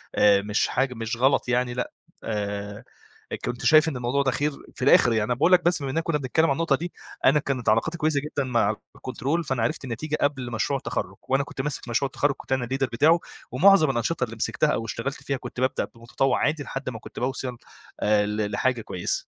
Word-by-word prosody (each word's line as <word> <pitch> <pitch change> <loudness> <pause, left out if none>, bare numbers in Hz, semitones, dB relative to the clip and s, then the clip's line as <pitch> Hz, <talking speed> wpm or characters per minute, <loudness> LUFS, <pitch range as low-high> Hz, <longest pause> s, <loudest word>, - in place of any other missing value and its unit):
آآ 100 -1 +5
مش 105 +1 0
حاج 130 0 0
مش 115 0 -4
غلط 130 +1 +2
يعني 125 0 +1
لأ، 125 0 -3 0.3
آآ 100 -1 -4 0.5
إ - - -1
كنت 125 0 -5
شايف 155 +4 +6
إن 140 - -5
الموضوع 125 +3 0
ده 130 - +2
خير، 145 +3 0 0.2
في - - -11
الآخر 120 -3 +6
يعني 110 -1 +2
أنا 110 - 0
باقول 155 +9 +2
لك 180 - +6
بس 175 -3 +2
بما 140 - -3
إننا 165 - 0
كنّا 165 -2 0
بنتكلّم 145 +3 +1
عن 145 - +2
النقطة 160 0 +1
دي، 175 +5 -6 0.3
أنا 145 +3 +6
كانت 130 -6 -1
علاقاتي 115 +10 +1
كويسة 155 -2 +1
جدًا 145 -1 -2
مع 115 -5 +1 0.2
الكنترول، 140 +6 -2
فأنا 130 -6 -1
عرفت 155 +7 -1
النتيجة 150 +5 -3
قبل 135 -4 0
مشروع 115 +5 0
التخرُّج، 135 - -4
وأنا 135 +1 +2
كنت 140 - -6
ماسك 140 -2 -3
مشروع 120 +4 +1
التخرّج 140 +1 0
كنت - - -13
أنا 130 -2 +1
الleader 135 +2 -1
بتاعه، 155 +8 +4 0.3
ومُعظَم 165 +4 +6
الأنشطة 130 +3 0
اللي 115 -2 -4
مسكتها 150 +6 +1
أو 115 - -2
اشتغلت 115 +5 -4
فيها 140 - -1
كنت 125 -1 -8
بابدأ 130 +1 0
بمتطوِّع 120 +3 0
عادي 150 -1 0
لحد 135 -1 -5
ما 115 -3 -7
كنت - - -10
باوصَل، 125 -1 -3 0.4
آآ 105 0 +3
ل 105 0 -2
لحاجة 130 -2 0
كويسة. 90 -4 -2
130 Hz, 215 wpm, -25 LUFS, 115-145 Hz, 0.5 s, شايف